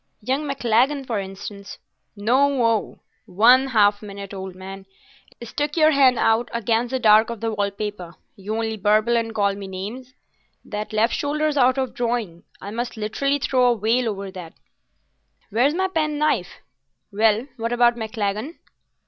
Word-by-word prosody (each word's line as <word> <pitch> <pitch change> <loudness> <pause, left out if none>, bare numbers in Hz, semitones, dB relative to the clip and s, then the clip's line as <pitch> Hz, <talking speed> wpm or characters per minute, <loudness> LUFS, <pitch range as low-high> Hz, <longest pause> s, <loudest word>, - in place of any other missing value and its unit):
Young 270 +6 -1
Maclagan, 270 +1 +1
for 230 -5 -2
instance——" 195 +1 -8 0.4
"No 255 +5 +2
o—one 230 +2 +2
half 205 -5 +3
minute, 200 -1 -8
old 190 -1 -7
man; 190 +1 -10 0.6
stick 295 +6 -3
your 310 -1 +5
hand 265 -4 +4
out 225 +2 +2
against 235 +1 0
the 260 - -1
dark 220 -2 +5
of 235 -2 -5
the 225 +1 -2
wall 205 -2 -1
paper—you 200 -1 -8
only 220 -1 -2
burble 215 +4 +2
and 225 -1 -1
call 200 -2 +2
me 195 0 -8
names. 220 +8 -7 0.5
That 210 0 -5
left 220 +2 +1
shoulder's 300 +1 -1
out 260 -1 +3
of 260 -2 -2
drawing. 230 -8 -2 0.2
I 200 - -8
must 235 +1 -4
literally 275 +7 -1
throw 255 -3 +2
a - - -6
veil 230 +3 +1
over 200 -2 -5
that. 180 -4 -9 1.0
Where's 255 +8 +2
my 380 +1 +1
pen 310 -5 -1
knife? 305 +1 +1 0.6
Well, 215 +3 +2
what 230 0 -3
about 240 0 +3
Maclagan?" 220 - -3
225 Hz, 155 wpm, -22 LUFS, 205-255 Hz, 1.0 s, your